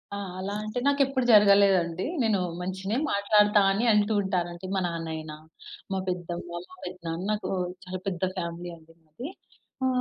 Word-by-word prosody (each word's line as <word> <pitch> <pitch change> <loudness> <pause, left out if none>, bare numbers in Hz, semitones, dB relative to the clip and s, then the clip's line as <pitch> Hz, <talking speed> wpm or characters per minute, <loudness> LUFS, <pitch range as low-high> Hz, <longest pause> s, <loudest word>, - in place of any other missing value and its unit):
ఆ! - - -4 0.2
అలా 195 +2 -3
అంటే 215 +3 -3
నాకు 285 0 +3
ఎప్పుడు 260 -2 -1
జరగలేదండి. 200 -4 +5 0.2
నేను 215 -3 +2 0.2
మంచినే 190 +4 -2
మాట్లాడుతా 205 +1 +4
అని 205 +5 +1
అంటూ 210 +1 +3
ఉంటారు 185 -3 0
అండి. 175 +2 -8
మా 190 - +1
నాన్నైయినా. 160 -2 -5 0.6
మా 190 - 0
పెద్దమ్మ, 175 -1 -4 0.2
మా - - -13
పెద్దనాన్న 175 -1 -5
నాకు 210 - -2 0.4
చాలా 185 0 -5
పెద్ద 180 -3 -2 0.2
ఫ్యామిలీ 170 +1 -4
అండి 165 0 -20
మాది. 160 - -8 0.6
ఆ! - - +4
190 Hz, 155 wpm, -27 LUFS, 170-210 Hz, 0.6 s, జరగలేదండి